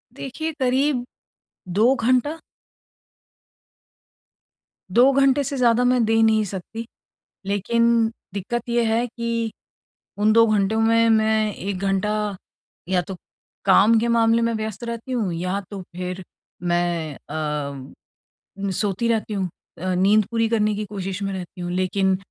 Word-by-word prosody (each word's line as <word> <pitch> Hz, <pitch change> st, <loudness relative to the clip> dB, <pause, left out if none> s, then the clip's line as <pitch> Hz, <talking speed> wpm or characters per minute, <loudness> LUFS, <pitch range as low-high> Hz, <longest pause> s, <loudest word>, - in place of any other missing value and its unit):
देखिए 315 Hz, +4 st, -4 dB
करीब 260 Hz, 0 st, +1 dB, 0.7 s
2 230 Hz, +6 st, +4 dB
घंटा। 255 Hz, +7 st, +1 dB, 2.5 s
2 250 Hz, +7 st, +6 dB
घंटे 275 Hz, +1 st, +3 dB
से 275 Hz, +1 st, -3 dB
ज़्यादा 245 Hz, -1 st, +3 dB
मैं 250 Hz, -1 st, +3 dB
दे 225 Hz, 0 st, +3 dB
नहीं 220 Hz, -1 st, +4 dB
सकती, 200 Hz, +5 st, -6 dB, 0.6 s
लेकिन 205 Hz, +4 st, +1 dB, 0.5 s
दिक्कत 240 Hz, +5 st, -4 dB
ये 235 Hz, 0 st, +2 dB
है 225 Hz, +2 st, +1 dB
कि 230 Hz, -1 st, -3 dB, 0.7 s
उन 215 Hz, +1 st, +3 dB
2 230 Hz, 0 st, +6 dB
घंटों 215 Hz, +1 st, +1 dB
में 230 Hz, 0 st, +4 dB
मैं 220 Hz, -1 st, +2 dB
1 195 Hz, 0 st, -4 dB
घंटा, 195 Hz, +1 st, 0 dB, 0.8 s
या 185 Hz, -1 st, +2 dB
तो 190 Hz, +2 st, -7 dB, 0.5 s
काम 225 Hz, +1 st, +5 dB
के 235 Hz, -, 0 dB
मामले 230 Hz, 0 st, +3 dB
में 230 Hz, 0 st, +1 dB
व्यस्त 220 Hz, +1 st, -4 dB
रहती 235 Hz, +2 st, -5 dB
हूँ 215 Hz, -7 st, -1 dB
या 185 Hz, +4 st, -2 dB
तो 195 Hz, -2 st, -6 dB
फिर 180 Hz, +1 st, -4 dB, 0.5 s
मैं 170 Hz, -3 st, 0 dB
अ, 145 Hz, -4 st, -6 dB, 0.6 s
सोती 205 Hz, +2 st, 0 dB
रहती 225 Hz, -2 st, 0 dB
हूँ 190 Hz, -3 st, -1 dB, 0.3 s
अ, 185 Hz, 0 st, -1 dB
नींद 205 Hz, +3 st, +4 dB
पूरी 225 Hz, -1 st, +1 dB
करने 215 Hz, -2 st, +1 dB
की 210 Hz, +1 st, -3 dB
कोशिश 195 Hz, -1 st, -5 dB
में 195 Hz, 0 st, -2 dB
रहती 180 Hz, -1 st, -7 dB
हूँ 175 Hz, 0 st, -3 dB
लेकिन 185 Hz, +1 st, +1 dB
220 Hz, 135 wpm, -22 LUFS, 190-235 Hz, 2.5 s, 2